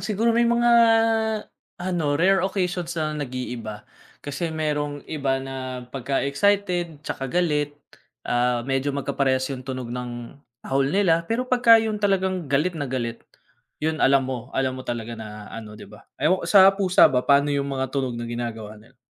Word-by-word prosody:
siguro 215 +3 +1
may 235 0 +3
mga 235 0 +3 1.0
ano, 175 -5 -1
rare 190 +4 +3
occasions 180 -3 -2
na 155 -1 -1
nag-iiba, 125 -6 -5 0.4
kasi 145 +4 -3
merong 150 -2 -2
iba 140 -4 -1
na 130 -1 -6
pagka 135 +2 -2
excited, 175 0 0
tsaka 135 -3 -4
galit, 150 -3 0 0.5
ah, 120 -1 +1
medyo 135 +1 -1
magkaparehas 135 -1 0
yung 130 -1 -7
tunog 130 -2 -5
ng 120 -1 -6 0.3
tahol 135 0 +1
nila, 170 -2 +2
pero 235 +3 0
'pagka 245 -2 +6
yun 220 -2 -1
talagang 190 -5 0
galit 150 +6 +1
na 145 -4 -3
galit, 120 -3 -3 0.6
yun 160 0 -1
alam 135 0 +4
mo, 125 -2 -5
alam 130 -1 +1
mo - - -7
talaga 120 -1 -4
na 105 -1 -9
ano, 110 -2 -8
'di - - -11
ba? 105 - -16
Ewan 175 +6 +2
ko - - -5
sa 195 -1 +7
pusa 195 -2 +4
ba 125 - +1
paano 140 +1 +4
yung 140 0 -1
mga 135 -1 -3
tunog 130 -4 -2
na 120 - -4
ginagawa 115 -3 -5
nila? 115 +4 -22
140 Hz, 165 wpm, -24 LUFS, 125-180 Hz, 1.0 s, sa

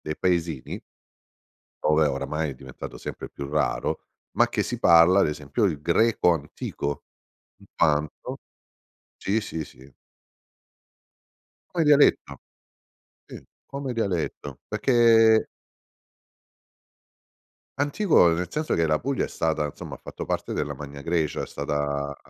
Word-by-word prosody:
dei 75 - -5
paesini 85 -6 -1 1.0
ove 75 0 +4
oramai 75 +2 -2
è 65 - -8
diventato 65 -1 -9
sempre - - -7
più 70 0 -7
raro, 75 +1 -1 0.4
ma - - +4
che - - -1
si - - -4
parla 85 +3 +6
ad - - +3
esempio 75 +7 -2
il 80 -7 0
greco 90 +2 +3
antico 70 -2 -4 0.5
intanto 75 0 -1 0.8
sì, 105 +3 0
sì, 80 -6 -5
sì. 65 +1 -15 1.8
Come 165 -2 +2
dialetto, 145 - +4 0.9
sì - - -11 0.2
come 140 -2 -5
dialetto 85 - -3
perché 115 -3 +4 2.3
Antico 145 - +4
nel 90 +1 -2
senso 155 +1 -1
che 85 - +2
la 75 -1 +2
Puglia 135 +1 -1
è - - -11
stata 80 -2 -1
insomma, 70 - -8
ha - - -27
fatto - - -7
parte - - -3
della 75 0 -2
Magna 70 0 -9
Grecia 80 -2 -1
è - - -5
stata 70 -1 -3
80 Hz, 120 wpm, -25 LUFS, 70-110 Hz, 2.3 s, parla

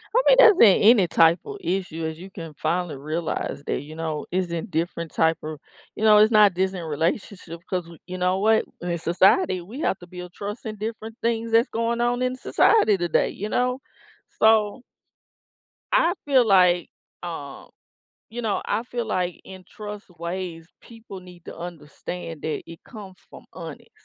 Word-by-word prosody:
I - - +6
mean, - - +6
that's 455 -7 +8
a 200 -5 +7
any 210 -4 +6
type 165 +1 +4
of 415 -1 -7
issue 180 - -3
as 160 0 -4
you 185 +2 -10
can 165 -5 -9
finally 175 +1 -2
realize 155 0 -4
that, - - -1
you 155 +2 -11
know, 160 -2 -4
it's 180 -1 -1
in 170 +4 -3
different 170 -2 -3
type 160 0 +2
of 155 -1 -6 0.4
you - - -5
know, 215 -1 +7
it's 215 +2 +5
not 210 -4 +5
just 190 +1 0
this 185 - -5
in - - -6
relationship 170 +2 -3
'cause 180 -1 -1
y 170 - -14
we 165 - -14
you 185 0 -6
know 180 +1 +1
what? 220 +2 +3 0.2
In 175 -1 -2
society, 185 - +3
we 215 +11 -10
have 190 - 0
to 175 - -13
build 180 0 -9
trust 210 +5 -7
in 215 -1 -4
different 220 +1 -6
things 230 0 -1
that's 230 +3 +4
going 230 +1 -1
on 240 +1 0
in 255 0 0
society 255 - +3
today, 175 -2 +1
you 210 +2 -6
know? 250 +2 0 0.6
So 220 +1 +3 1.1
I 340 - +4
feel 265 -4 +4
like, 180 -3 +4 0.3
uh, 155 -5 -7 0.7
you 240 +2 -5
know 215 -3 -1
I 210 +2 -1
feel 240 -1 -4
like 180 -4 -2
in 190 -1 -12
trust 210 -1 -8
ways, 170 -1 -5
people 225 -4 -12
need 180 -2 -15
to - - -9
understand 165 0 -8
that 155 - -3
it 165 -1 -12
comes 200 -5 -11
from - - -13
honest. - - -10
185 Hz, 185 wpm, -24 LUFS, 170-220 Hz, 1.1 s, that's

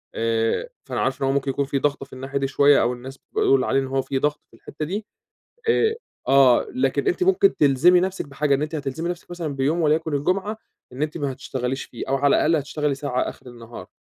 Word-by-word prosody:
آآ 115 - 0 0.2
فأنا - - -3
عارف - - -1
إن 135 - +1
هو 135 - +1
ممكن 140 -1 0
يكون 140 +1 -1
في 140 0 -1
ضغطة 140 0 -1
في - - -19
الناحية 135 +2 -4
دي 135 - 0
شوية 145 +1 +4
أو 120 - +1
الناس 130 +2 -10
بيقول 135 -1 +3
عليه 135 - +1
إن 135 - -2
هو 135 0 0
في 135 0 -2
ضغط 150 +1 0
في - - -18
الحتّة 150 +5 -6
دي، 205 +6 -4 0.6
آآ، 445 0 +3 0.3
آه 135 -2 +5
لكن 255 - 0
أنتِ 365 -1 +1
ممكن 385 +1 +4
تلزمي 150 +6 +5
نفْسِك 190 +1 -2
بحاجة، 140 0 +1
إن 135 - -3
أنتِ 155 +2 -3
هتلزمي 155 +4 -3
نفْسِك 175 0 -6
مثلًا 165 -5 -4
بيوم 150 +6 0
وليكن 155 0 +1
الجمعة 190 +9 -1 0.4
إن 130 - -6
أنتِ 155 +2 -2
ما 140 -3 -2
تشتغليش 130 0 -4
فيه، 120 - -8
أو 135 - +2
على 140 +1 +3
الأقل 165 +2 +3
هتشتغلي 145 -1 -1
ساعة 135 -3 -2
آخر - - -5
النهار، 120 -1 -10
140 Hz, 225 wpm, -23 LUFS, 135-160 Hz, 0.6 s, آه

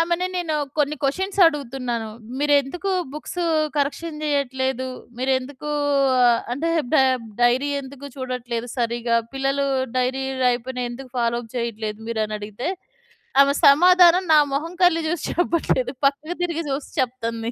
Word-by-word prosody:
ఆమెని 345 +2 +1
నేను 325 -3 -2 0.2
కొన్ని 295 +1 +1
కొషన్సడుగుతున్నాను. 275 - +1 0.3
"మీరెందుకు 290 +6 +1 0.2
బుక్సూ 345 +3 -4 0.3
కరెక్షన్ 300 +3 -2
చెయ్యట్లేదు? 265 -3 -1 0.3
మీరెందుకూ 260 +3 -2 0.5
ఆహ్, 235 -1 +4
అంటే 330 +5 -1 0.2
బె 270 - +6 0.4
డైరీ 250 +4 +3
ఎందుకు 275 +1 -10
చూడట్లేదు 250 -2 -4
సరిగ్గా? 235 0 0 0.2
పిల్లలూ 275 +1 0 0.3
డైరీ 260 +1 0 0.2
రాయికపోయిన 250 +1 0
ఎందుకు 255 +1 -9
ఫాలో 235 0 +1
అప్ 225 - -15
చెయ్యట్లేదు 220 -2 -3
మీరనడిగితే," 215 +1 -3 0.7
ఆమె 280 0 +4
సమాధానం 355 +4 +6
నా 305 - +8
మొహం, 325 +5 -2
కళ్ళు 345 -2 +4
జూసి 340 0 -2
చెప్పట్లేదు. 330 -7 +1
పక్కకి 300 +5 0
తిరిగి 335 -1 -2
జూసి 275 +1 -4
చెప్తంది. 230 -2 -3
270 Hz, 120 wpm, -22 LUFS, 240-310 Hz, 0.7 s, నా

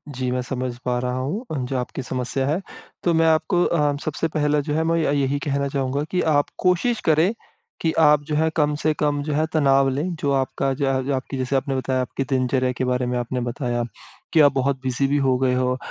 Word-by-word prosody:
जी, 130 0 -2
मैं 125 0 0
समझ 125 -1 -4
पा 125 -1 +1
रहा 125 0 -2
हूँ 150 - -3
अ, - - -2
जो 130 0 -2
आपकी 125 +2 -4
समस्या 130 +1 -2
है। 155 +5 +1 0.4
तो 170 - +2
मैं 165 0 +3
आपको 170 +3 +2
अ, 150 -3 +1
सबसे 155 +1 -1
पहला 150 -1 +2
जो 150 +1 -2
है, 160 +1 +1
मैं 165 +1 +1
य 145 -2 +1
यही 140 +2 0
कहना 140 0 0
चाहूँगा 140 0 -1
कि 180 - +1 0.2
आप 145 - +2
कोशिश 185 +6 +2
करें 160 +4 +4 0.5
कि 165 - +1
आप 150 -2 +5
जो 150 0 -2
है 160 +1 +2
कम 150 -2 +2
से 155 - +2
कम 145 -1 +1
जो 150 0 -2
है 155 +2 +2
तनाव 135 -3 +4
लें 150 +7 -2
जो 140 - 0
आपका 135 0 0
ज - - -8 0.3
जो 140 - +1
आपकी 135 +1 -4
जैसे 130 +1 -1
आपने 135 +1 0
बताया 130 0 0
आपकी 130 +2 -3
दिनचर्या 130 -1 +1
के 130 - 0
बारे 125 0 0
में 125 0 -1
आपने 120 +1 -3
बताया 120 0 -2 0.5
कि 160 - +5
आप 145 -1 +6
बहुत 135 +1 +1
बिज़ी 130 +1 0
भी 145 +1 +1
हो 135 -2 +2
गए 130 -1 +2
हो। 125 0 +1
140 Hz, 235 wpm, -22 LUFS, 130-150 Hz, 0.5 s, आप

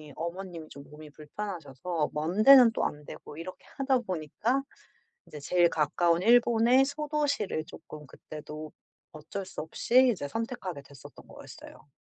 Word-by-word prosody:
어머님이 170 -1 -6
좀 140 - -11
몸이 150 0 -12
불편하셔서 155 -1 -5
먼 165 +8 0
데는 255 -2 +9
또 - - -1
안 150 0 -4
되고 150 - -11
이렇게 170 +3 -9
하다 270 -2 +2
보니까 210 - -2 0.7
이제 150 - -10
제일 175 +4 +3
가까운 170 +3 +1
일본의 240 +3 +5
소도시를 285 - -2
쪼끔 150 -1 -12
그때도 155 +2 -9 0.4
어쩔 160 +6 -7
수 - - -7
없이 250 +10 +3
이제 145 -9 -5
선택하게 195 - -5
됐었던 140 -2 -15
거였어요. - - -13
175 Hz, 320 characters per minute, -28 LUFS, 155-235 Hz, 0.7 s, 데는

